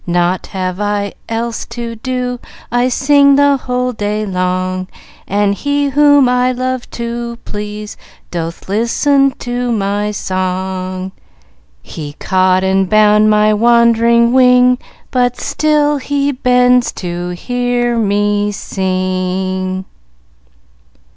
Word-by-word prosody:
"Naught 175 +1 0
have 185 -1 -4
I 205 -1 -1 0.2
else 230 0 -3
to 230 0 -6
do; 250 0 -3 0.3
I 245 +1 +2
sing 280 +2 +4
the 285 0 +4
whole 250 -1 -2
day 210 0 -2
long; 185 -1 -2 0.4
And 200 0 +1
He 285 +5 -1
whom 285 0 +5
most 250 - +2
I 250 0 +2
love 255 0 -3
to 235 0 -4
please 210 0 -6 0.3
Doth 170 -1 -5
listen 275 +7 +2
to 245 0 -3
my 205 -1 -1
song, 185 -1 -3 0.7
He 150 -2 -8
caught 185 +2 +1
and 190 0 +1
bound 215 0 +4
my 215 0 +3
wandering 235 +1 +3
wing, 250 -1 +5 0.3
But 250 -1 0
still 300 -1 +1
He 285 +1 -1
bends 250 -1 +3
to 175 -1 -5
hear 245 +3 -1
me 205 -1 +1
sing." 185 -1 -2
220 Hz, 115 wpm, -15 LUFS, 190-250 Hz, 0.7 s, whom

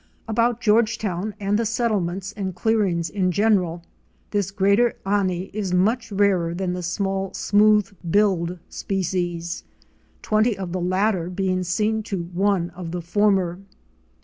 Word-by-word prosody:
About 230 +1 +1
Georgetown 215 -3 +1
and 205 +1 +1
the 230 - 0
settlements 200 -5 -1
and 195 -4 -4
clearings 190 -5 +1
in 185 -1 0
general, 185 -4 +1 0.5
this 205 -3 0
Greater 200 +4 +2
Ani 195 -2 0
was 195 -3 -1
much 220 +6 +1
rarer 190 -4 +2
then 180 0 -2
the 180 - -4
small 195 +2 -2
Smooth 210 0 +3 0.2
billed 180 -3 +2
species, 175 -3 -3 0.6
twenty 215 +1 +2
of 190 -3 -5
the 185 0 -2
latter 185 0 +1
being 185 0 -1
seen 210 +5 0
to 200 -5 -4
one 185 -2 +1
of 175 -1 -7
the 175 +1 -4
former. 190 -1 +1
195 Hz, 135 wpm, -23 LUFS, 180-210 Hz, 0.6 s, Smooth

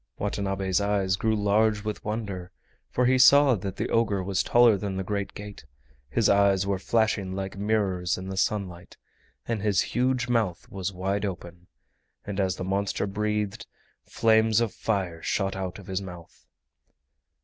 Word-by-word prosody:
Watanabe's 95 -2 -1
eyes 100 -2 +1
grew 110 +3 0
large 105 +1 +2
with 105 -1 -4
wonder, 100 -5 -4 0.4
for 125 - +1
he 130 +1 +3
saw 140 +1 +7
that 100 -3 -4
the - - -2
ogre 105 -4 +1
was 95 0 0
taller 120 -2 +5
than 95 -1 -4
the 95 - -2
great 100 +1 -3
gate, 105 -4 -9 0.5
his 105 - +2
eyes 100 -1 +3
were 100 -1 -1
flashing 105 -3 0
like 95 0 -4
mirrors 95 -3 0
in 95 +1 -7
the 95 - -5
sunlight, 95 -3 -2 0.5
and 115 -3 -2
his 100 -3 +2
huge 125 0 +1
mouth 110 -8 -1
was 95 0 -3
wide 95 +2 -2
open, 90 -2 -6 0.6
and 100 -1 -4
as 95 -2 +1
the - - -5
monster 100 +2 -1
breathed, 105 +1 -2 0.4
flames 110 -1 +3
of 115 -3 0
fire 95 -6 -2
shot 95 -1 -1
out 95 -2 -4
of 100 - -12
his 95 +1 -3
mouth. 90 -3 -11
100 Hz, 160 wpm, -26 LUFS, 95-110 Hz, 0.6 s, saw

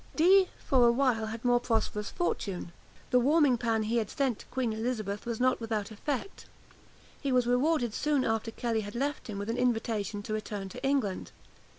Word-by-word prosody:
Dee, 370 +4 +6
for 250 -3 +3
a - - +6
while, 235 -3 +1
had 225 +2 -6
more 245 0 +4
prosperous 225 -3 -1
fortune. 195 - -3 0.4
The 250 - +5
warming 280 -1 +4
pan 225 -2 +1
he 225 +2 0
had 220 -3 0
sent 270 -6 -1
to - - -12
Queen 250 -3 -1
Elizabeth 220 -2 -3
was 235 -2 -3
not 255 -1 +2
without 220 -2 -2
effect. 270 - -4 0.7
He 275 - -1
was 250 -1 +3
rewarded 245 -1 +2
soon 290 -1 +1
after 225 0 0
Kelly 225 -1 -1
had 205 +1 -8
left 285 +4 -2
him 210 -3 -5
with 205 +3 -3
an 235 - -3
invitation 225 -4 -1
to 215 - -4
return 210 -2 -4
to - - -10
England. 270 -9 0
235 Hz, 190 wpm, -30 LUFS, 215-260 Hz, 0.7 s, Dee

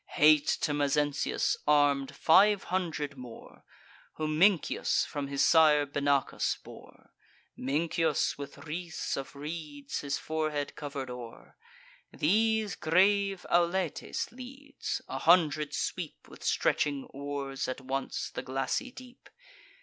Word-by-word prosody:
Hate 150 -1 +5
to 145 - 0
Mezentius 145 0 +1
arm'd 145 -2 +3
five 200 +4 +5
hundred 155 -6 -2
more, 125 -2 -12 0.5
Whom 155 0 -2
Mincius 190 -2 +3
from 145 -1 -4
his 140 0 +1
sire 155 -3 +5
Benacus 140 -1 0
bore: - - -15 0.4
Mincius, 155 +3 0
with 140 -1 -8
wreaths 165 +2 -4
of 135 +1 -6
reeds 145 -1 -6
his 140 -1 -2
forehead 155 -2 -3
cover'd 140 -3 -5
o'er. 115 - -10 0.6
These 220 +4 +1
grave 195 +4 +2
Auletes 175 -1 0
leads: 270 +3 -6
a 135 - -4
hundred 155 -2 +3
sweep - - -4
With - - -14
stretching 145 -2 +1
oars 140 -1 -4
at 130 - -4
once 135 +1 -3
the - - -4
glassy 135 - -2
deep. 250 -1 -14
150 Hz, 115 wpm, -30 LUFS, 140-175 Hz, 0.6 s, Hate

